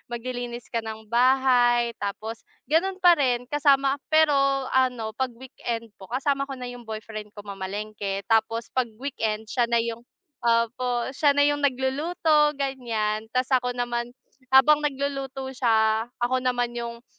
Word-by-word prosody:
Maglilinis 245 0 -6
ka 230 - 0
ng 220 0 -7
bahay 245 0 +3
tapos 215 +3 -4 0.2
gano'n 360 +6 +1
pa 360 -2 +6
rin 255 -6 +1
kasama 275 0 +2
pero 315 -1 +5 0.4
ano, 250 -4 +1
pag 260 +4 -1
weekend 235 -3 -6
po 190 - -11
kasama 275 +2 -1
ko 270 - -5
na 250 - -7
yung 240 -2 -12
boyfriend 215 -1 -6
ko 205 - -9
mamalengke 200 0 -5
tapos 225 +2 0
pag 255 -2 0
weekend 220 -4 -3
siya 240 -2 +1
na 235 - +2
yung 230 0 -4 0.4
opo 240 +1 0
siya 285 +1 +3
na 285 - +5
yung 290 0 +2
nagluluto 295 +3 +2
gan'yan, 225 -6 -2
tapos 255 +1 0
ako 250 - -3
naman 240 -1 -2 0.4
habang 265 +3 +6
nagluluto 275 -2 -3
siya 225 -2 +2 0.2
ako 255 +1 +1
naman 245 -1 0
yung 235 0 -6
245 Hz, 145 wpm, -25 LUFS, 225-270 Hz, 0.4 s, pa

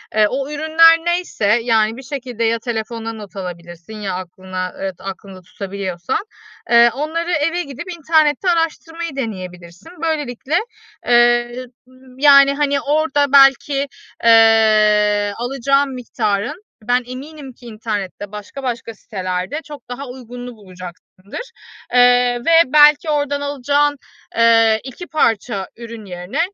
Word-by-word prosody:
eee, 215 -1 +4
o 270 +2 -3
ürünler 320 +2 +5
neyse, 345 - +1
yani, 225 -1 +1
bir 265 - -10
şekilde 250 -3 -5
ya 230 0 +1
telefonuna 225 0 -4
not 210 -3 -11
alabilirsin 175 0 -8
ya 205 -3 -4
aklına, 185 0 -6
evet, 190 -1 -4
aklında 195 -1 -9
tutabiliyorsan, 185 -2 -4 0.5
eee, 235 0 +6
onları 325 +5 -3
eve 330 +2 0
gidip 280 -2 -8
internette 315 +1 +2
araştırmayı 330 -1 -2
deneyebilirsin. 185 - -7
Böylelikle, 295 -3 -2 0.5
eee, - - 0 0.5
y 255 - -6 0.5
yani, 275 0 +6
hani, 285 -1 0
orada 290 0 +1
belki, 275 +1 +5 0.4
eee, 215 -2 +4
alacağın 275 +3 0
miktarın 240 - -3 0.2
ben 245 +3 +1
eminim 270 +2 -9
ki 245 - -18
internette 210 -3 -5
başka 210 +6 -9
başka 235 -2 -4
sitelerde 185 +5 -4
çok 290 -5 -12
daha 265 +3 -6
uygununu 245 -1 -9
bulacaksındır, 185 - -11 0.4
eee, 245 0 +4
ve 330 - +3 0.2
belki 300 +1 +6
oradan 285 -1 -1
alacağın, 285 +1 0 0.4
eee, 225 -1 +4
2 270 +7 -9
parça 225 - 0
ürün 230 -2 -9
yerine 180 - -6
245 Hz, 120 wpm, -18 LUFS, 210-285 Hz, 0.5 s, eee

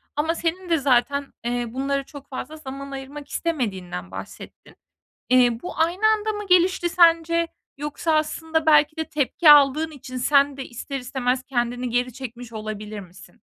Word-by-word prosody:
ama 320 +3 0
senin 345 +2 -3
de 330 - +3
zaten, 280 +1 +1
eee, 240 0 -1
bunlara 275 +3 -1
çok 285 0 -13
fazla 300 +4 -6
zaman 275 -1 -8
ayırmak 275 +2 -8
istemediğinden 190 - -3
bahsettin. 95 +1 -10 0.5
Eee, 245 -2 +4
bu 360 - -7
aynı 350 +6 +2
anda 435 0 +2
mı 415 -1 -6
gelişti 360 -1 +3
sence 335 -1 +4 0.3
yoksa 295 +3 -2
aslında 320 +1 -1
belki 300 0 +4
de 320 - 0
tepki 300 +2 +2
aldığın 295 +2 +5
için 260 -3 -8
sen 280 +2 +3
de 270 - -5
ister 275 +3 -6
istemez 250 0 -1
kendini 245 -1 -2
geri 245 +1 0
çekmiş 245 -2 -8
olabilir 215 -1 -6
misin? 185 -1 -14
275 Hz, 155 wpm, -23 LUFS, 245-320 Hz, 0.5 s, aldığın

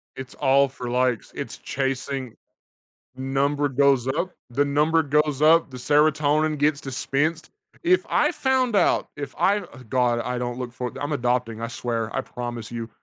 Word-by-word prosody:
It's 130 -1 -8
all 140 0 +4
for, 125 -2 -7
likes, 125 -2 0
it's - - -5
chasing 135 -2 -3 0.8
number 140 +2 0
goes 135 -2 +3
up, 170 +7 -1 0.2
the 140 +4 +2
number 150 +3 +2
goes 150 -1 +1
up, 160 0 +5
the 130 - -9
Serotonin 150 +3 +2
gets 145 0 +2
dispensed. 145 +4 -2 0.3
If 360 +1 +3
I - - +2
found 260 -4 +1
out, 190 - +2
if 145 -2 -6
I 200 +2 +3
uh, 200 - -11
God, 120 -1 +2
I 125 +1 -3
don't 120 0 -3
look 125 -2 -5
for 125 0 -5
I'm 145 +1 -2
adopting, 120 -4 -1
I 115 - -3
swear, 115 -2 -3
I - - +1
promise 120 -3 -6
you, 115 -1 -5
135 Hz, 165 wpm, -24 LUFS, 125-150 Hz, 0.8 s, up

